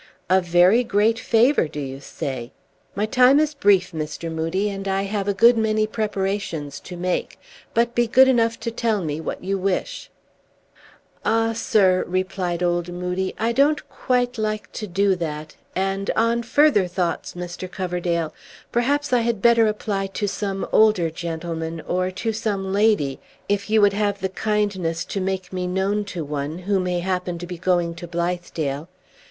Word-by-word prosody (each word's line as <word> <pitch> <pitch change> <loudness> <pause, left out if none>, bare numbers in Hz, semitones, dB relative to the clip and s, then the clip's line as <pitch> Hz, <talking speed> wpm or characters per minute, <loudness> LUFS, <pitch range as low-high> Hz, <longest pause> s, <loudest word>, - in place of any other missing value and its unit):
"A 190 0 +5
very 180 +7 +4
great 225 0 +2
favor, 235 - +3
do 150 - -7
you 135 -1 -5
say? 130 -3 -5 0.4
My 205 +2 0
time 250 +5 +5
is 305 0 +1
brief, 195 -8 +3
Mr. 155 +1 -5
Moodie, 165 +5 -1
and 195 -1 -4
I 195 0 0
have 200 0 -2
a 200 - +2
good 230 +3 +6
many 215 -1 +2
preparations 195 -8 -3
to 180 - -9
make. 180 +1 -2 0.4
But 235 +1 +2
be 240 0 +2
good 260 +3 +6
enough 230 -3 +2
to 230 - -2
tell 225 -4 0
me 155 0 -3
what - - -5
you 195 +1 -1
wish." 195 - -2 1.1
"Ah, 225 +1 +2
sir," 190 -5 +3
replied 185 -1 -2
Old 175 0 0
Moodie, 180 +1 -3
"I 225 +2 +1
don't 285 +5 +2
quite 245 -1 0
like 215 0 -2
to 215 - -5
do 195 +2 +2
that; 155 -2 -5 0.2
and, 195 +1 -1
on 230 +1 +2
further 235 -5 +3
thoughts, 180 -1 -2
Mr. 175 +1 -6
Coverdale, 175 -3 -2 0.4
perhaps 280 +4 +1
I 245 - +5
had 230 -2 0
better 230 0 +5
apply 205 -2 -2
to 205 +2 -3
some 195 -1 -3
older 210 -7 +4
gentleman, 165 0 -4
or 185 +2 -1
to 190 +5 -3
some 200 -3 -2
lady, 200 -10 +2 0.3
if 200 0 -1
you 220 0 +4
would 200 -1 +5
have 205 -1 0
the 190 - -2
kindness 190 -5 -1
to 195 - -3
make 190 -1 -3
me 180 -1 -2
known 195 +3 0
to 180 -4 -5
one, 145 +2 -3
who 190 +2 0
may 180 -1 -1
happen 180 -1 -2
to 175 - -6
be 175 -1 -7
going 175 -2 +1
to 170 +1 -8
Blithedale. 170 -3 -3
195 Hz, 170 wpm, -22 LUFS, 175-215 Hz, 1.1 s, good